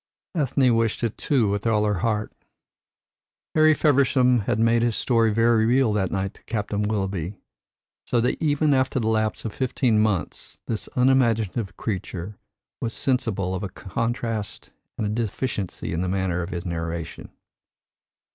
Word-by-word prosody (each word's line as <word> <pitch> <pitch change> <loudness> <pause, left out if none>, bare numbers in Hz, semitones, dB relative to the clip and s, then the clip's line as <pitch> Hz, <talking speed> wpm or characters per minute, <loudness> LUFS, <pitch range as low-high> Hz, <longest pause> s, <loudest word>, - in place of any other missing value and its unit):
Ethne 135 -6 +2
wished 115 0 0
it 115 -2 -1
too 130 -7 +1
with 100 +2 -1
all 105 -2 +2
her 105 -3 0
heart. 105 +1 -1 1.2
Harry 155 0 +5
Feversham 130 -4 +3
had - - +1
made 115 +1 +3
his 120 -2 +1
story 115 -3 +2
very 115 +1 +3
real 125 -2 +3
that 95 -3 0
night 95 0 -2
to - - -22
Captain 105 -2 -2
Willoughby; 100 -3 -2 0.7
so 120 - +2
that 120 - 0
even 150 -1 +2
after 130 0 +1
the 115 - -2
lapse 110 0 0
of 110 - -3
fifteen 125 -3 +1
months 105 -7 -1
this 110 - -3
unimaginative 120 -5 +2
creature 95 -2 -4 0.5
was 115 - -2
sensible 110 -8 0
of 95 - -3
a 100 - -4
contrast 115 +1 -4 0.3
and 110 - -1
a - - -1
deficiency 110 -4 -3
in 85 - -1
his 90 - -1
manner 95 -2 0
of 85 0 -5
narration. 85 -1 -5
110 Hz, 150 wpm, -24 LUFS, 100-125 Hz, 1.2 s, Harry